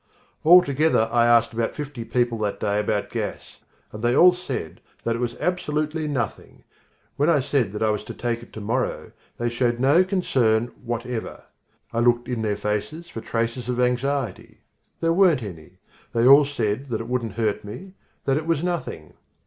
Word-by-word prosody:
Altogether 155 -7 +5
I 120 0 +4
asked 115 -1 +4
about 115 0 -2
fifty 145 -5 -6
people 120 -1 0
that 105 -2 -2
day 105 0 0
about 105 -1 -1
gas, - - -5 0.3
and 105 - -8
they 120 +1 +2
all 180 +4 +7
said 140 - -6 0.2
that 115 - 0
it - - -4
was 120 -1 -2
absolutely 155 -3 -1
nothing. 125 -8 -4 0.5
When 145 +3 +2
I 160 -3 +4
said 130 -6 0
that 105 - -2
I 110 - +3
was 105 - -2
to - - -7
take 120 -1 -2
it 120 - -14
to 110 - -7
morrow, 115 +5 -2 0.3
they 120 - -1
showed 120 0 0
no 145 +8 +5
concern 125 - +1
whatever. 120 -1 -4 0.5
I 115 - 0
looked 120 0 +2
in 125 -3 -2
their 105 -2 -1
faces 105 +12 -3
for 115 - -7
traces 115 +2 -2
of 125 0 -1
anxiety. 125 -2 -1 0.4
There 165 0 +2
weren't 170 -8 +4
any. 90 -2 -10 0.4
They 115 0 +2
all 140 +3 +8
said 130 -1 -2
that 115 -2 -2
it 115 - -7
wouldn't 120 -4 -2
hurt 110 -2 -1
me, 180 - -9 0.3
that 135 0 +2
it 155 +1 -4
was 165 -1 +1
nothing. 170 - -4
120 Hz, 180 wpm, -24 LUFS, 115-145 Hz, 0.5 s, all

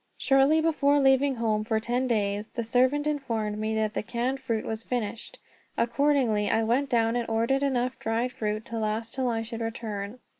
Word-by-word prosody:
Shortly 275 +3 +4
before 295 -3 +2
leaving 270 0 +3
home 220 -2 0
for 220 0 0
ten 245 +3 -1
days, 210 -2 -1
the 235 - -4
servant 255 +5 +2
informed 225 -8 -2
me 220 0 -1
that 215 -1 0
the - - -1
canned 245 +4 -2
fruit 230 -4 -2
was 220 0 -4
finished. 230 -2 -4 0.4
Accordingly, 240 -4 +2
I 225 0 +2
went 255 +5 +1
down 230 -2 +2
and 240 -2 -2
ordered 230 +5 +1
enough 255 -3 0
dried 230 +3 -1
fruit 215 -1 -3
to 230 -1 -4
last 220 +1 -2
till 260 -2 0
I 225 -1 -1
should 230 0 -6
return. 220 -1 -4
230 Hz, 185 wpm, -27 LUFS, 220-265 Hz, 0.4 s, Shortly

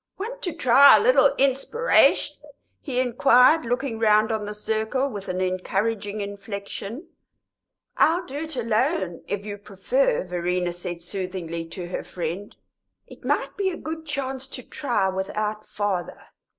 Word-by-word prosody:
"Want 475 +6 -6
to 355 - -2
try 280 -2 +7
a - - +3
little - - +4
inspiration?" 290 - +3 0.4
he 255 -3 -2
inquired, 250 +4 +5
looking 245 -1 -2
round 215 0 +4
on 215 -1 -2
the 210 - -4
circle 220 +6 -1
with 200 -3 -7
an 185 0 -2
encouraging 200 +3 -1
inflexion. 200 - -6 0.9
"I'll 345 +3 +3
do 275 -1 -7
it 315 0 -4
alone, 215 -7 0
if 205 0 -3
you 205 -1 -6
prefer," - - 0
Verena 180 0 -2
said 175 -1 -6
soothingly 175 -3 -4
to 175 +2 -7
her - - -4
friend. 180 +4 -5 0.5
"It - - -15
might - - -1
be 395 -2 0
a 350 - -5
good 320 0 -6
chance 270 -2 -3
to 255 -2 -8
try 230 -11 -1
without 210 +3 -3
father." 200 -4 -3
220 Hz, 145 wpm, -24 LUFS, 190-275 Hz, 0.9 s, try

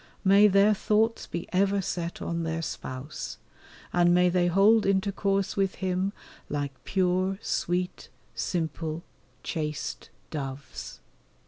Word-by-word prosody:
May 200 +1 +7
their 200 +1 +5
thoughts 220 +2 +1
be 170 - -5
ever 200 +2 +3
set 175 -2 -3
on 170 0 -2
their 165 0 -2
Spouse, 135 -1 -6 0.6
and 175 0 +5
may 180 0 +5
they 175 0 +2
hold 205 +5 +5
intercourse 195 0 +1
with 195 -1 +1
Him 185 +1 -1 0.4
like 145 -1 -2
pure, 185 0 +1
sweet, 180 -4 -2 0.2
simple, 165 -1 -2 0.4
chaste 150 -3 -4 0.2
doves. 140 -2 -6
180 Hz, 115 wpm, -28 LUFS, 165-195 Hz, 0.6 s, May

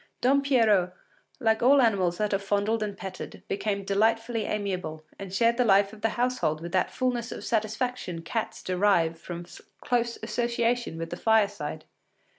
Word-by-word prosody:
Don 275 +3 +3
Pierrot, 220 -10 +3 0.5
like 220 -3 +2
all 275 +4 +6
animals 190 -8 +2
that 210 -1 0
are 195 - +2
fondled 205 +3 0
and 205 -2 -3
petted, 190 0 -8
became 200 0 -2
delightfully 225 +3 +1
amiable, 185 -7 -3 0.2
and 195 -2 -7
shared 230 +4 +2
the 250 - +4
life 200 -2 +4
of 215 - -12
the 225 - +2
household 245 -11 0
with 170 +1 -7
that 185 0 +1
fulness 245 -2 -2
of - - -7
satisfaction 220 -5 -2
cats 225 +6 -4
derive 180 -3 +2
from 175 0 -7 0.3
close 235 -1 0
association 235 -3 -1
with 165 0 -5
the 175 - -4
fireside. 200 -9 +1
210 Hz, 160 wpm, -27 LUFS, 185-235 Hz, 0.5 s, all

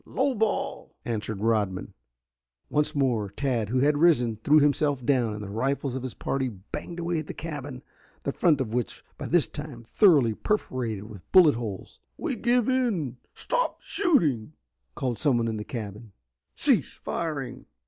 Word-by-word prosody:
Low 270 +1 0
ball!" 220 -3 -2
answered 110 -3 -3
Rodman. 105 -5 0 0.8
Once 150 0 +1
more 120 -7 +1
Tad, 115 -1 -1
who 125 +2 +1
had 145 +1 +3
risen, 125 -10 +4
threw 150 +2 +6
himself 145 -2 +2
down, 120 -5 +2
and 105 - -6
the 100 - -6
rifles 135 +4 -1
of 130 - -3
his 130 -1 -6
party 135 -1 -1
banged 105 - -8
away 170 -1 -1
at 155 - -6
the - - -6
cabin, 145 -5 -6 0.4
the 140 - -1
front 155 -1 +3
of 115 -4 -2
which 120 -1 -2
was - - -36
by - - -4
this 175 -2 +5
time 145 -6 -8
thoroughly 140 - +4
perforated 120 - -2
with 105 -4 -12
bullet 175 -5 +8
holes. 110 -5 -6 0.2
"We 315 -7 -2
give 240 +1 +2
in. 215 - 0 0.2
Stop - - -1
shooting!" 160 - +1 0.4
called 125 -3 -2
someone 120 -6 +2
in 110 -1 -2
the 105 - -4
cabin. 105 -2 -7 0.4
"Cease - - +2
firing!" 150 -6 -4
130 Hz, 165 wpm, -27 LUFS, 115-160 Hz, 0.8 s, bullet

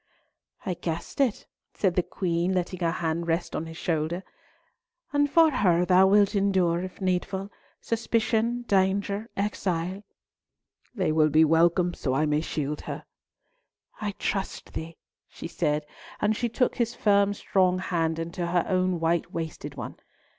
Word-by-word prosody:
"I 185 - 0
guessed 170 - -4
it," 250 -6 +1 0.3
said 190 -4 +1
the 180 - +2
Queen, 175 0 -1
letting 180 0 -2
her 170 -2 +1
hand 170 -1 -2
rest 165 +1 -1
on 160 - -3
his 160 0 -9
shoulder. 165 +2 -1 0.9
"And 290 0 +3
for 325 +1 +5
her 180 -9 +3
thou 185 +1 +6
wilt 200 +1 +4
endure, 190 -4 +2
if 185 0 -7
needful, 190 +1 -1 0.3
suspicion, 230 +1 0
danger, 200 +1 +1
exile?" 190 -2 -1 0.9
"They 185 -7 +1
will 155 0 +4
be 155 +2 +5
welcome, 170 +3 +3
so 130 -6 -2
I 155 - +2
may 150 0 +1
shield 150 -2 -3
her." - - -5 1.0
"I 205 -1 -2
trust 195 -1 -3
thee," 165 +1 -6 0.3
she - - -8
said, 150 -3 -1 0.3
and 215 +1 +2
she 240 +2 -1
took 250 +2 0
his 235 -1 0
firm 200 -2 +3
strong 185 -2 +2
hand 165 -3 -1
into 170 +1 -3
her 175 0 +1
own 185 -2 +1
white 165 0 0
wasted 160 -3 -5
one. 125 - -7
180 Hz, 150 wpm, -27 LUFS, 165-200 Hz, 1.0 s, thou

